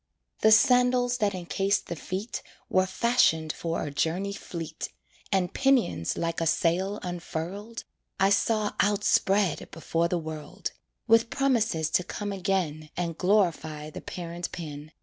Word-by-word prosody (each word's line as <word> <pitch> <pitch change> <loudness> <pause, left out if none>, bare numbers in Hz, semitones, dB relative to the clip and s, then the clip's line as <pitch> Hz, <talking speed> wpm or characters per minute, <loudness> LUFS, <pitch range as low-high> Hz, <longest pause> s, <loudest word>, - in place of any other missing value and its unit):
The 220 - +5
sandals 245 +1 +4
that 200 -3 +1
encased 195 +3 0
the 170 - -5
feet 190 +8 -4 0.3
Were 185 0 +3
fashioned 190 -8 +2
for 165 0 -3
a 145 - -4
journey 180 +7 -1
fleet, 165 -5 -6 0.4
And 190 -3 +1
pinions, 245 - +2
like 165 0 -1
a 165 - +1
sail 185 +6 +1
unfurled, 180 +5 -5 0.4
I 195 +1 +4
saw 210 +1 +2
outspread 200 -2 +2
before 165 +1 -1
the 175 - 0
world, 155 -2 -5 0.3
With 230 0 +4
promises 225 - +1
to 180 - +3
come 205 +3 -4
again 175 -6 -1
And 170 -2 -2
glorify 165 -6 +1
the - - -8
parent 175 0 -5
pen. 150 -2 -7
185 Hz, 135 wpm, -27 LUFS, 165-210 Hz, 0.4 s, The